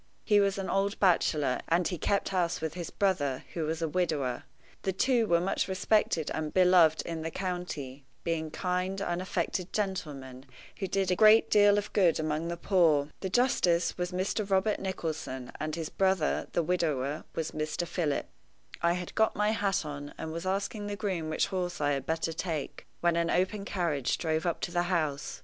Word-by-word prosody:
He 210 -2 +4
was 200 -1 +2
an 195 -1 -3
old 195 +2 0
bachelor, 155 -7 +2
and 170 +1 +2
he 180 - -4
kept 200 +5 0
house 180 -3 0
with 160 -1 -3
his 175 -1 -5
brother, 145 -10 0
who 165 -2 -2
was 160 +2 -2
a - - +1
widower. 150 -7 -1 0.4
The 190 - -1
two 235 +3 +2
were 170 -2 +4
much 180 +3 0
respected 190 -4 +1
and 155 -1 -3
beloved 180 -4 +5
in 165 -1 -4
the 160 - -3
county, 165 -7 -5 0.2
being 160 -2 -1
kind, 180 +3 -2
unaffected 180 0 -2
gentlemen, 145 -10 -4 0.3
who 195 - -2
did 190 0 0
a - - +3
great 215 +3 +6
deal 205 -1 +6
of 205 0 -3
good 175 -6 +3
among 155 +1 -1
the 170 0 -3
poor. 165 -6 +3
The 190 - -3
justice 185 -7 +2
was 180 0 -3
Mr. 195 +3 -1
Robert 195 +2 +2
Nicholson, 160 -9 -4
and 155 0 -2
his 165 -2 -4
brother, 190 -5 +1
the 170 - +2
widower, 155 -5 -1
was 160 - -2
Mr. 155 +2 -2
Philip. 165 -4 -1 0.6
I 170 0 +3
had 180 0 -5
got 220 0 +2
my 210 +1 +2
hat 200 -6 0
on, 145 -1 -7
and 160 - -5
was 165 +3 -5
asking 200 +2 -2
the 205 - -3
groom 185 -7 -2
which 155 - +1
horse 180 -1 -2
I 145 -1 +1
had 135 -2 -2
better 165 0 -1
take, 160 -4 -4
when 175 -1 +3
an 170 0 +1
open 190 +4 0
carriage 165 -10 -1
drove 160 0 -1
up 170 - -1
to - - -3
the 175 0 +1
house. 155 -5 -1
175 Hz, 190 wpm, -29 LUFS, 155-190 Hz, 0.6 s, great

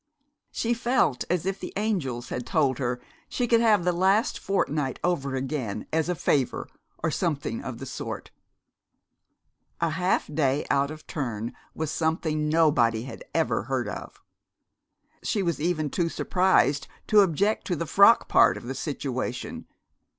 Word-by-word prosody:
She 235 +1 0
felt 240 - +1
as 180 -1 0
if 195 0 -2
the - - -7
angels 155 - -2
had 125 - -3
told 140 -5 +1
her 125 -2 -1 0.3
she 245 - -1
could 230 0 +4
have 215 -5 +4
the 180 - +2
last 190 +5 +2
fortnight 150 -8 -1
over 140 -7 0
again, 130 -5 -3
as 160 +1 +1
a 180 - +1
favor, 140 -5 0 0.4
or - - +1
something - - -2
of - - -6
the - - -7
sort. - - -6 1.5
A 170 -1 +1
half 180 +3 +1
day 145 -2 0
out 140 0 +2
of 155 0 -9
turn 120 -6 -4 0.2
was 160 -1 -2
something 160 -1 0
nobody 140 -9 +3
had 135 - -8
ever - - +1
heard - - -1
of. - - -7 1.0
She 205 -3 0
was 170 -4 -1
even 155 -3 0
too 170 -2 0
surprised 165 -7 +2 0.2
to 215 - +5
object 195 +4 +1
to 180 - 0
the 170 - -3
frock 200 +7 +6
part - - +5
of - - -9
the - - -4
situation. - - -4
160 Hz, 155 wpm, -26 LUFS, 140-190 Hz, 1.5 s, frock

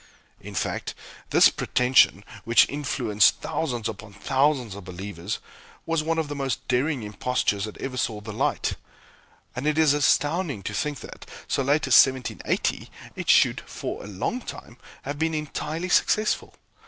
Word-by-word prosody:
In - - -10
fact, - - -3 0.3
this - - +7
pretension, 125 -5 +3 0.2
which 115 0 +5
influenced 125 -8 +2
thousands 120 -8 -2
upon 110 -1 -8
thousands 130 +1 +1
of 100 0 -9
believers, 95 +1 -5 0.5
was 165 -1 0
one 165 +1 -1
of 160 -2 0
the 145 - -4
most 135 -2 -3
daring 130 +1 0
impostures 105 -1 -1
that 110 - -9
ever 130 -1 -5
saw 110 -4 -1
the 105 0 -8
light; - - 0 0.8
and 130 +4 -3
it 155 0 +1
is 155 -3 +5
astounding 145 - +1
to 105 - -4
think 145 +5 -2
that, - - -11 0.2
so - - 0
late 145 +3 +2
as - - 0
1780, 130 -2 -2 0.3
it - - -5
should, - - +5
for - - -6
a - - -9
long 105 - -3
time, 120 - -9 0.3
have 145 +1 -5
been 160 0 0
entirely 155 +3 -3
successful. 215 +4 +1
130 Hz, 155 wpm, -25 LUFS, 105-150 Hz, 0.8 s, this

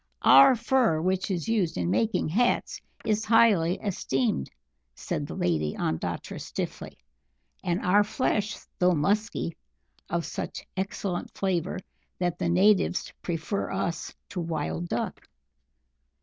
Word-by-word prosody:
"Our 270 -1 +8
fur, 235 -7 +2
which 185 +4 0
is 180 -2 -2
used 205 -8 +1
in 90 0 0
making 110 +7 +1
hats, 240 +9 +1 0.2
is 215 0 +1
highly 210 -7 +4
esteemed," 135 - -1 0.5
said - - -3
the - - -6
Lady 80 -3 0
Ondatra 80 - -3
stiffly, - - -5 0.7
"and 175 +1 0
our 200 +3 +5
flesh, 215 -1 -1 0.2
though 180 -1 +4
musky, 200 +2 0 0.5
of 170 0 -1
such - - -5
excellent 190 -1 -3
flavour 185 -2 -1 0.4
that 175 -1 -1
the - - 0
natives 190 +1 +3
prefer 175 +4 -2
us 170 0 -3
to 180 - -4
Wild 170 +1 -2
Duck." 120 - -3
180 Hz, 120 wpm, -27 LUFS, 165-210 Hz, 0.7 s, Our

